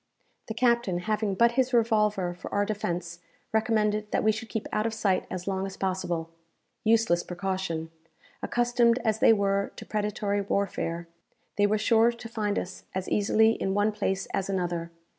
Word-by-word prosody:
The 220 - -5
captain, 235 -6 +2
having 215 0 -1
but 235 +4 +4
his 255 0 +1
revolver 210 -5 +2
for 175 - -9
our 205 0 +1
defence, 175 -5 -3 0.3
recommended 215 -1 +1
that - - +1
we 220 - +5
should 220 +1 -6
keep 225 - -3
out 215 +1 +1
of 225 - -4
sight 195 -4 +1
as 180 0 -5
long 195 0 -1
as 195 - -9
possible. 175 -3 -2 0.5
Useless 220 -6 +3
precaution! 180 -3 -3 0.5
Accustomed 240 -1 +2
as 220 -1 +1
they - - +6
were 200 -2 +1
to - - -9
predatory 205 -1 -1
warfare, 180 -4 -2 0.5
they 205 0 +3
were 215 +1 +2
sure 225 +2 +4
to 235 0 -9
find 215 -3 -2
us 185 - -5
as 190 -1 -2
easily 220 +2 +4
in 195 -3 -1
one 205 +1 +2
place 195 -2 -1
as 195 0 -1
another. 175 -3 -2
205 Hz, 170 wpm, -27 LUFS, 190-220 Hz, 0.5 s, they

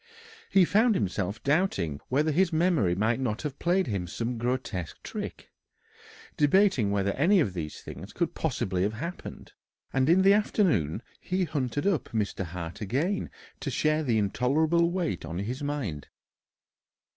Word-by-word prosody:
He 190 -2 +5
found 220 +4 +3
himself 100 - -2
doubting 140 - +1
whether 150 +4 +1
his 180 +4 +2
memory 160 - +2
might 110 +5 +1
not 120 -2 -2
have 145 -2 -5
played 180 +2 +2
him 100 -7 -2
some 115 +6 -3
grotesque 120 -8 -3
trick, - - -7 0.8
debating 150 - +3
whether 100 -1 +1
any 175 - +3
of 120 - +1
these 80 -4 -5
things - - -9
could - - -1
possibly 95 -2 -1
have 100 +3 +1
happened; 170 +9 -7 0.4
and 135 +2 +2
in 185 +3 +5
the 195 +1 +7
afternoon 145 - +1 0.2
he 185 +1 -1
hunted 145 -3 -2
up 195 -6 +1
Mr. 105 -3 -2
Hart 85 +3 -7
again 150 - -1 0.3
to 145 - -3
share 155 +3 +1
the 120 -7 +1
intolerable 150 - +2
weight 175 - -2
on 80 +1 -5
his 120 +8 -3
mind. 135 - -3
130 Hz, 150 wpm, -28 LUFS, -, 0.8 s, the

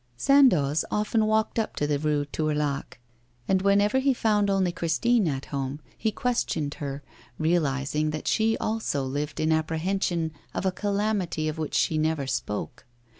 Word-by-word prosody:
Sandoz 175 - +4
often 215 +1 +1
walked 220 +1 +1
up 220 - -2
to 145 - 0
the 145 -1 0
Rue 150 -1 0
Tourlaque, 150 -1 -2 0.5
and 190 -1 +2
whenever 200 +5 +3
he 270 0 +2
found 210 -3 +2
only 190 -2 +2
Christine 195 +6 +1
at 135 -3 -2
home, 135 +1 -3 0.2
he 220 - -1
questioned 185 -12 -1
her, 140 0 -4 0.3
realising 155 -2 0
that 155 0 -5
she 225 0 +2
also 215 -11 -1
lived 145 +3 -3
in 155 +1 +1
apprehension 160 +1 0 0.2
of - - -2
a 190 - +2
calamity 200 -5 -1
of 155 +1 -3
which 155 - -3
she 155 - +2
never 155 -2 0
spoke. 120 -1 -4
160 Hz, 155 wpm, -26 LUFS, 145-210 Hz, 0.5 s, Sandoz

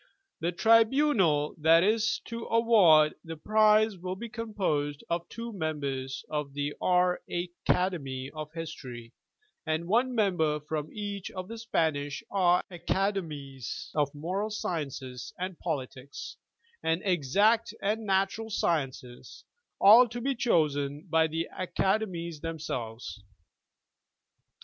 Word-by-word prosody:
The 170 +2 -1
tribunal 220 - +3
that 165 +2 +5
is 215 +1 +1
to 230 0 -6
award 200 -10 +5
the 165 -1 -7
prize 215 +3 +4
will 185 +1 -4
be 230 +4 -7
composed 190 -11 -2
of 170 0 -2
two 230 0 -6
members 140 -6 -3
of 150 -2 -3
the 145 0 -2
R. 180 0 +2
Acad, 175 +1 0 0.4
of 155 -1 -7
History, 130 -8 -8 0.5
and 160 +1 -1
one 245 +6 +2
member 175 -8 +1
from 150 0 -4
each 205 -2 -5
of 185 -1 -7
the 230 +1 -7
Spanish 150 -10 -1
R. 180 -2 +3
Academies 165 - -3
of 145 -2 +1
Moral 185 +8 -2
Sciences 140 - -4
and 185 -1 -5
Politics, 140 -4 -5 0.5
and 165 +2 0
Exact 200 - +2
and 215 +3 -1
Natural 195 +3 0
Sciences 135 - -3 0.2
— - - -56
all 225 +5 +8
to 240 +1 -5
be 270 +3 0
chosen 150 - 0
by 160 0 +4
the 165 +1 -3
Acade 195 +3 0
mies 170 -3 -6
themselves. 125 -10 -5
175 Hz, 120 wpm, -29 LUFS, 150-210 Hz, 0.5 s, all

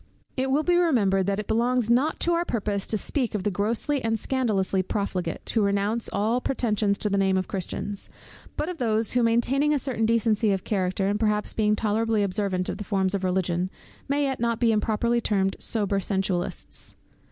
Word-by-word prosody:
It 265 0 0
will 285 +3 +2
be 350 +2 +3
remembered, 205 - +2
that 200 0 0
it 210 - -3
belongs 240 +1 +1
not 255 +7 +2
to 345 - +2
our 340 0 +2
purpose 205 - -2
to 220 - 0
speak 245 +1 -1
of 200 - -2
the 205 - 0
grossly 225 +8 0
and 225 0 +1
scandalously 210 -7 0
profligate, 185 -3 -3
who 225 - +3
renounce 200 +3 +1
all 220 +5 0
pretensions 210 -6 0
to 210 - -1
the 200 - +2
name 190 -1 +2
of 185 - -1
Christians; 195 +1 -4 0.5
but - - -1
of 355 -3 -5
those 225 -2 +1
who, 245 - +2
maintaining 255 +6 +2
a - - +2
certain 250 -5 0
decency 225 -2 +2
of 190 - -2
character, 190 -1 -1
and 205 +1 0
perhaps 210 -1 0
being 210 -1 +2
tolerably 220 0 +1
observant 190 -2 -1
of - - -4
the - - -3
forms 190 -2 0
of 195 -1 -2
Religion, 180 -1 0 0.4
may 285 +1 +1
yet 270 -2 -1
be - - -9
not 235 0 0
improperly 230 +1 +2
termed 195 -3 +1
sober 205 -3 0
sensualists. 190 -2 -2
215 Hz, 195 wpm, -25 LUFS, 195-235 Hz, 0.5 s, be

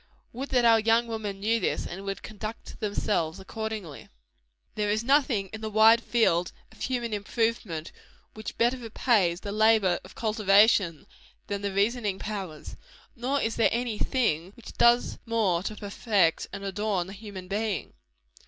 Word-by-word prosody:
Would 265 +4 -5
that 250 -3 +3
our 225 -1 +6
young 225 +2 +3
women 215 -4 -5
knew 225 +3 +1
this, 185 - -1
and 190 +3 -7
would 195 0 -4
conduct 215 +1 -8
themselves 200 -6 -1
accordingly! 215 -6 -6 0.6
There 210 -1 -1
is 215 +2 0
nothing 255 -7 +2
in 220 - -6
the 220 - -3
wide 220 +2 +6
field 180 -8 +2 0.2
of - - -18
human 240 -3 -2
improvement 205 -6 -2 0.4
which 215 -1 -7
better 240 +2 +2
repays 215 -6 +1
the 200 - -5
labor 215 -4 +3
of - - -14
cultivation, 205 -5 +3 0.4
than 200 -1 -4
the 200 -1 -2
reasoning 205 0 0
powers. 190 -8 -6 0.4
Nor 265 +3 -1
is 225 0 -1
there 230 - +4
any 235 -2 -2
thing 190 - 0
which 235 - -11
does 240 +1 +3
more 210 -7 +1
to 210 +3 -4
perfect 200 -4 +1
and 200 -1 -7
adorn 200 -2 -1
the 190 - -9
human 200 -3 -9
being. 205 -1 -2
215 Hz, 155 wpm, -27 LUFS, 195-230 Hz, 0.6 s, our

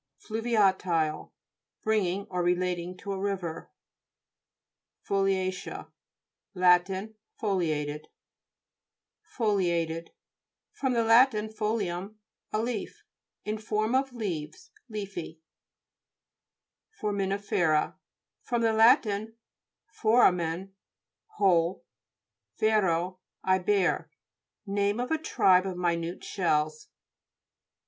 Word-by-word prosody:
FLU'VIATILE 190 -8 0 0.5
Belonging 200 -3 0
or 180 -1 -1
relating 180 0 -1
to 200 - -6
a 195 - -3
river. 190 -5 -3 1.4
FOLIA'CEA 190 -1 -1 0.6
Lat. 180 0 +5 0.5
Foliated. 155 -7 -1 1.3
FOLIA'TED 170 -7 0 0.6
fr. 275 - -3
lat 235 +2 +5
folium, 210 -3 -2 0.4
a 215 - 0
leaf. 235 -4 -4 0.4
In 215 +1 -2
form 215 +1 -1
of 265 +1 +1
leaves; 170 -11 -5 0.2
leafy. 195 -7 -6 1.6
FORAMISTI'FERA 195 -6 0 0.5
fr. 240 - -2
lat. 230 +3 +5 0.8
foramen, 190 -6 +2 0.6
hole, 180 -3 +2 0.7
yero, 185 -5 +1 0.2
I 185 0 +3
bear. 190 0 +1 0.6
Name 200 +2 0
of 250 +3 -2
a 320 - +1
tribe 190 - +3
of 185 -2 -4
minute 170 0 -1
shells. 155 -4 -1
195 Hz, 75 wpm, -28 LUFS, 175-215 Hz, 1.6 s, Lat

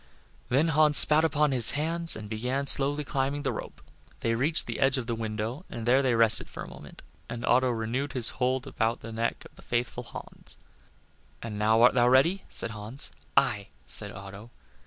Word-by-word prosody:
Then 145 +6 +1
Hans 150 -1 +4
spat 155 +1 +6
upon 150 -2 +1
his 125 +1 +4
hands, 165 +2 +2
and 110 -1 -9
began 125 +6 -3
slowly 145 +2 +5
climbing 140 +1 -3
the 135 - -1
rope. - - -9 0.4
They 115 - -1
reached 140 +8 +2
the - - -6
edge 135 0 +2
of 125 - -4
the 120 - -3
window 110 +5 -5
and 115 - -7
there 130 +3 +3
they 130 -3 0
rested 115 -1 +1
for - - -8
a - - -10
moment, - - -13 0.3
and 115 0 -6
Otto 130 +1 +2
renewed 120 +4 -3
his 125 -4 0
hold 130 +1 0
around 115 -4 -3
the 115 - -9
neck 115 +1 -4
of - - -17
the - - -15
faithful 120 +1 -3
Hans. - - -12 0.9
"And 105 -2 -7
now 110 +2 +2
art 125 - +5
thou 120 -1 +2
ready?" 165 +10 +2
said - - -4
Hans 110 +5 -6 0.3
"Aye," 105 -8 +1 0.2
said - - 0
Otto. 100 +3 -11
125 Hz, 195 wpm, -26 LUFS, 115-140 Hz, 0.9 s, spat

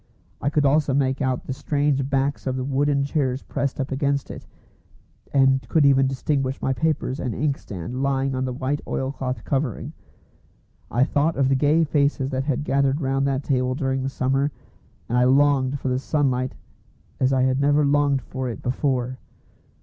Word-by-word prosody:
I 140 - +1
could 145 -1 +1
also 140 -1 +3
make 135 0 +1
out 130 -2 0
the 130 - -3
straight 140 -1 0
backs 140 +1 -1
of 130 - 0
the 130 - -2
wooden 140 +1 +1
chairs 135 -3 -1
pressed 140 0 -3
up 135 0 -2
against 140 0 -1
it, - - -10 0.8
and 135 -1 +4
could 155 -3 +3
even 135 -1 +5
distinguish 135 0 -1
my 135 - 0
papers 150 -1 -1
and 120 -5 -3
inkstand 125 - -3
lying 135 0 0
on 130 0 -1
the 130 - -2
white 135 +3 -2
oilcloth 130 -1 -3
covering. 135 -4 -2 1.0
I 120 +3 +2
thought 150 +4 +1
of 135 -1 +2
the 135 - +3
gay 150 +4 +3
faces 145 -2 +1
that 130 0 -2
had 145 -1 -1
gathered 140 0 +1
round 135 -1 0
that 135 0 -1
table 130 -2 0
during 135 -1 -1
the 135 - -2
summer, 135 +2 0 0.6
and 120 +1 +1
I 125 - +4
longed 135 0 +3
for 130 - -2
the 125 0 0
sunlight 130 -3 0 0.6
as 130 0 +2
I 130 -1 +2
had 130 0 +2
never 145 +1 +3
longed 140 -1 +2
for 130 -1 -4
it 115 - -7
before. 130 -1 -1
135 Hz, 180 wpm, -23 LUFS, 130-140 Hz, 1.0 s, even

